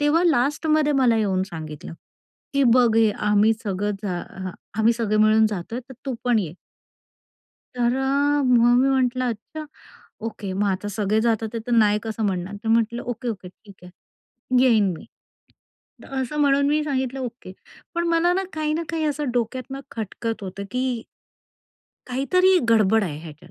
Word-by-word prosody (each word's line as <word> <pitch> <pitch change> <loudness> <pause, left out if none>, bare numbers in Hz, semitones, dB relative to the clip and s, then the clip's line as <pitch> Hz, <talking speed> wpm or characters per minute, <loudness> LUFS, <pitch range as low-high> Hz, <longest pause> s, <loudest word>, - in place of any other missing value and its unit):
तेव्हा 305 +4 +3
लास्टमध्ये 300 +1 +2
मला 235 -2 +4
येऊन 190 -3 +1
सांगितलं 155 -3 -8 0.6
की 280 - +3
बघ, 240 -1 +4
हे 220 -2 +5
आम्ही 210 +1 +3
सगळ 205 +1 -1
जा 180 -4 -2
अ 190 -1 -7 0.3
आम्ही 225 +2 +4
सगळे 220 -2 0
मिळून 215 +1 +5
जातोय 215 +4 -4
तर 260 - -10
तू 265 - -1
पण 240 -3 +3
ये. 165 -3 -5 1.2
तर 240 0 +1
अ, 285 +2 +1
मग 240 -1 +4
मी 270 - +3
म्हंटलं 255 -1 +1
अच्छा 300 +8 -7 0.6
ओके. 200 -3 -5
मग 200 +2 0
आता 200 +2 -3
सगळे 215 +1 +1
जातात 225 0 0
तर - - -5
नाही 210 -2 +4
कसं 225 0 -4
म्हणणार 185 +1 -3
तर 225 - -2
म्हंटलं 230 +1 +1
ओके-ओके 230 -6 -5
ठीक 200 +2 -17
आहे 240 +7 -6
येईन 220 -6 +4
मी. - - -12 1.0
असं 270 +2 -3
म्हणून 280 0 +3
मी 300 +1 +2
सांगितलं 265 -2 -2
ओके, 240 -6 -7 0.4
पण 340 0 0
मला 335 +1 +3
ना 385 +1 0
काही 310 -1 -1
ना 330 - -1
काही 325 -1 -2
असं 295 -2 -1
डोक्यातनं 255 +3 -3
खटकत 225 0 -4
होतं 195 +1 -6
की. 250 -2 -1 1.0
काहीतरी 365 +9 +3
गडबड 220 -1 +4
आहे 150 -4 -5
ह्याच्यात. 155 0 -12
235 Hz, 160 wpm, -23 LUFS, 210-270 Hz, 1.2 s, हे